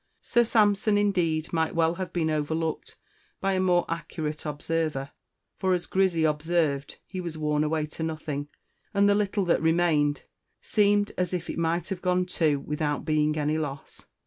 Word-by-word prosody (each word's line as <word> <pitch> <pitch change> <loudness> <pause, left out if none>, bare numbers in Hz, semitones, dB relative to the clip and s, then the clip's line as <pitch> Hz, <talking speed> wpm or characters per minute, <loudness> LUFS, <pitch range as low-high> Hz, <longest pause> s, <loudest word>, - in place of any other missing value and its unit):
Sir 240 - +3
Sampson, 210 -2 +3
indeed, 175 -6 +1
might 160 0 0
well 165 0 +3
have 185 +1 -5
been 160 -3 0
overlooked 160 +1 -2 0.4
by 195 0 0
a 185 - +1
more 180 -2 +3
accurate 160 -2 -4
observer; 150 -2 -2 0.5
for, 190 -1 +2
as 175 - -3
Grizzy 185 -4 +1
observed, 150 -2 0
he 185 -2 -5
was 170 -3 -5
worn 150 -1 +1
away 155 0 0
to 155 +2 -9
nothing, 155 -3 -3 0.5
and 200 0 +5
the 205 - +5
little 205 -1 0
that 170 - +2
remained 160 -3 +2 0.4
seemed 205 -1 +2
as 180 0 0
if 175 -1 -4
it - - -5
might 170 +1 0
have 185 -2 -4
gone 180 0 +1
too 155 -5 +1
without 150 0 -2
being 155 -1 +1
any 150 +1 0
loss. 140 -3 -7
165 Hz, 170 wpm, -27 LUFS, 150-185 Hz, 0.5 s, and